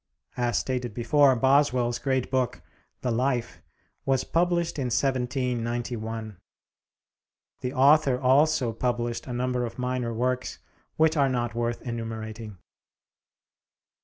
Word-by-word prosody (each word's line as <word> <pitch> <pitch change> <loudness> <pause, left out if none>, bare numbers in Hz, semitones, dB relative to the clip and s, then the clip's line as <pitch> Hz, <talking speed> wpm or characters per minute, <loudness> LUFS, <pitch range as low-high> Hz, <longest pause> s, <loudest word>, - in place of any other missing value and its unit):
As 120 -1 0
stated 125 -4 -2
before, 135 +3 +4
Boswell's 125 -2 +2
great 130 0 -1
book, 125 -2 -1 0.4
the 125 - -1
'Life,' 120 0 -1 0.4
was 135 -2 +1
published 170 -2 0
in 135 - -1
1791. 120 -4 -2 1.2
The 125 +1 -4
author 140 -1 +4
also 135 -1 +3
published 120 +1 -2
a 125 - -4
number 125 0 -1
of 120 - -5
minor 125 -1 -2
works 125 +2 -2 0.4
which 160 0 +3
are 140 -3 +3
not 120 -3 -1
worth 120 0 -2
enumerating. 110 -3 -6
125 Hz, 110 wpm, -26 LUFS, 120-135 Hz, 1.2 s, before